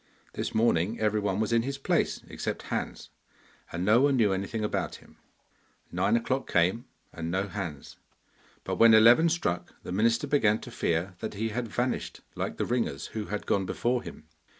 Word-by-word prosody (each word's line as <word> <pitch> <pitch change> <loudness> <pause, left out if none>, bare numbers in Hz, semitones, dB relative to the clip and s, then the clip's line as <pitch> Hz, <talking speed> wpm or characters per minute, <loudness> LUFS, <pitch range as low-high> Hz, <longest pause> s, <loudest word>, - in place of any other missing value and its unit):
This - - -4
morning 110 -2 +2
everyone 105 -2 0
was 110 +1 0
in 115 - +4
his 135 +3 -4
place 135 - 0
except - - -4
Hans, - - -4 0.6
and 85 +2 -3
no 110 +5 +5
one 140 0 +4
knew 105 -6 +3
anything 100 +3 -3
about 105 - -2
him. - - -17 0.7
Nine 110 +4 +2
o'clock 130 +3 -2
came, 95 +8 +2 0.3
and 80 0 -5
no 95 +3 -1
Hans, 85 -9 -6 0.7
but - - -3
when 115 -1 +7
eleven 120 +9 +7
struck 90 - -2
the - - -7
minister 115 +7 +2
began 115 -7 +3
to - - -9
fear 85 +3 -1
that 110 -1 -5
he 110 +2 -1
had 120 +2 -3
vanished 125 +4 -2
like - - -4
the - - -1
ringers 115 - -1
who 110 -2 -3
had 105 0 -4
gone 95 -2 0
before 120 0 0
him. 80 - -10
110 Hz, 175 wpm, -28 LUFS, 95-120 Hz, 0.7 s, when